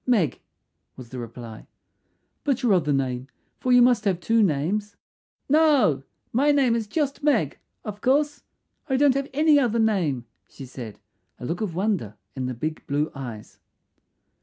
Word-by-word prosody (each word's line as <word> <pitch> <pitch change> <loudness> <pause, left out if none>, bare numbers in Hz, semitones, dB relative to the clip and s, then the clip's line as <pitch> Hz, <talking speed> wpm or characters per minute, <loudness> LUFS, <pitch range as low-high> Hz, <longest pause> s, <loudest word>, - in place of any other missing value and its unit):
"Meg," 205 - +2 0.6
was 125 -3 -11
the 130 - -7
reply. 115 -1 -9 0.8
"But 275 -3 0
your 230 -5 +4
other 160 -5 +2
name, 130 -2 -1 0.3
for 255 - 0
you 245 -1 +7
must 245 -3 +3
have 190 -4 +1
two 225 +5 +2
names." 200 +5 0 0.5
"No, 280 - +4 0.3
my 280 +5 +4
name 270 -5 +3
is 225 -2 -2
just 285 +4 -2
Meg, 250 - +1 0.3
of 210 -1 -6
course; 290 +3 +1 0.5
I 265 - +2
don't 285 -1 +5
have 275 +1 -2
any 300 +1 +4
other 235 -4 +1
name," 180 - +1 0.2
she 135 - -10
said, 120 -4 -9 0.4
a - - -6
look 165 - -3
of 190 -7 -3
wonder 185 - -1 0.2
in 130 -1 -3
the 130 - -4
big 155 +6 -4
blue 145 +2 0
eyes. 120 -6 -8
205 Hz, 160 wpm, -24 LUFS, -, 0.8 s, you